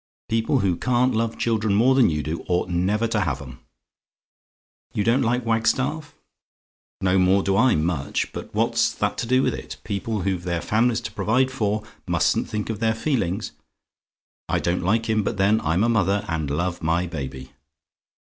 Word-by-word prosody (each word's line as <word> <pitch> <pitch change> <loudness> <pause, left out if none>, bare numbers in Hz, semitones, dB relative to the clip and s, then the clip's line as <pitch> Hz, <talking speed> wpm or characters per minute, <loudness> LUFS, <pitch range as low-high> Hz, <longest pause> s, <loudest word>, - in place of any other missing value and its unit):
People 115 +3 +1
who 90 -4 +1
can't 125 +4 +2
love 115 0 -1
children 110 -3 +1
more 120 +5 +4
than 130 -6 +5
you 75 -2 -2
do, 80 +3 -4
ought 90 0 0
never 95 +6 +1
to 115 -1 0
have 75 -9 -1
'em. 65 -3 -10 1.4
"YOU 105 - +1
DON'T 115 +5 +3
LIKE 120 0 0
WAGSTAFF? 130 +7 0 0.9
"No 95 0 +3
more 95 +2 +3
do 95 - +1
I 125 +5 +4
much; 75 -3 -1
but - - -7
what's 115 +1 +1
that 105 0 -1
to 120 - -2
do 130 +2 +3
with - - +1
it? - - -7
People 105 +1 -3
who've 95 -1 -1
their 85 -1 -1
families 115 +6 +1
to - - -6
provide 130 +4 +1
for, 110 -4 -1 0.2
mustn't - - +1
think 105 +1 -3
of 105 - -5
their 110 -1 +1
feelings. 110 - -1 1.0
I - - +2
don't 85 +1 0
like 110 +6 +1
him; 110 -1 +2
but 105 +1 -3
then 100 +3 +3
I'm 80 +6 +1
a - - +3
mother, 100 -3 +1
and 80 -4 -2
love 85 +5 -2
my 85 +2 +1
baby. 65 -6 -6
105 Hz, 180 wpm, -23 LUFS, 90-115 Hz, 1.4 s, than